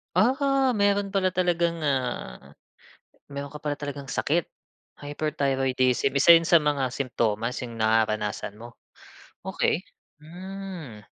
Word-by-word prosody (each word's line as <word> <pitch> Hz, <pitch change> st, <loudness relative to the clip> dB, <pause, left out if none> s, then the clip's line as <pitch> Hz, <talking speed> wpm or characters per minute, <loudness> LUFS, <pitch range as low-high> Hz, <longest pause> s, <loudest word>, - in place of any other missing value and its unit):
Ah, 270 Hz, +2 st, +3 dB
meron 200 Hz, -2 st, +1 dB
pala 185 Hz, -2 st, +1 dB
talagang 170 Hz, -2 st, 0 dB
ah, 130 Hz, -, -3 dB, 0.8 s
meron 140 Hz, 0 st, -6 dB
ka 150 Hz, -, -7 dB
pala 145 Hz, -1 st, -2 dB
talagang 140 Hz, -1 st, -6 dB
sakit. 165 Hz, +3 st, 0 dB, 0.5 s
Hyperthyroidism 135 Hz, -3 st, 0 dB
isa 140 Hz, +5 st, +7 dB
yun 165 Hz, -, -2 dB
sa 170 Hz, 0 st, +6 dB
mga 140 Hz, -4 st, 0 dB
simtomas 115 Hz, -3 st, -1 dB
'yong 120 Hz, -2 st, -7 dB
nararanasan 110 Hz, -2 st, 0 dB
mo? 120 Hz, +1 st, -11 dB, 0.7 s
Okey. -, -, 0 dB, 0.4 s
Hmm. 175 Hz, -, -8 dB
145 Hz, 115 wpm, -26 LUFS, 125-180 Hz, 0.8 s, isa